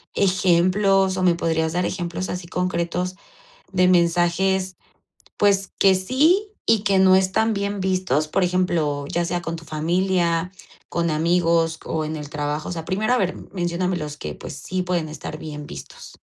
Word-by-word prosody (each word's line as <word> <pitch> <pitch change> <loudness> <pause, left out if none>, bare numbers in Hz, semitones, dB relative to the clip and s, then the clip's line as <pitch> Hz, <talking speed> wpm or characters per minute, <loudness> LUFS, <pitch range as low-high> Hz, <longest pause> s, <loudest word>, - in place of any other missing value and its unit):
ejemplos 190 +1 +3
o 185 - -1
me 175 -2 +4
podrías 160 -1 0
dar 180 0 0
ejemplos 175 +1 -3
así 180 -1 -5
concretos 180 0 -2 0.6
de 185 -1 +3
mensajes 180 +2 +2 0.6
pues 195 -2 +2
que 195 -1 +6
sí 310 - +2
y 220 -2 +3
que 195 -2 +3
no 185 0 +6
están 205 +4 +2
bien 200 0 -2
vistos, 185 -6 0
por 185 +4 +1
ejemplo, 165 -6 0
ya 175 +3 -1
sea 175 +1 -2
con 165 0 -4
tu 165 0 -10
familia, 170 +2 0 0.4
con 170 -1 0
amigos 165 0 +2
o 160 -1 -2
en 155 +1 -4
el 150 -1 -7
trabajo, 150 +1 -3
o - - -4
sea, 165 -2 -5
primero 210 +7 0
a - - +3
ver, 185 -4 0 0.2
menciónamelos 175 -4 -2
que - - -6
pues 140 - -8
sí 185 +6 -3
pueden 175 -3 -1
estar 155 0 -7
bien 150 -1 -7
vistos. - - -10
180 Hz, 165 wpm, -22 LUFS, 165-190 Hz, 0.6 s, que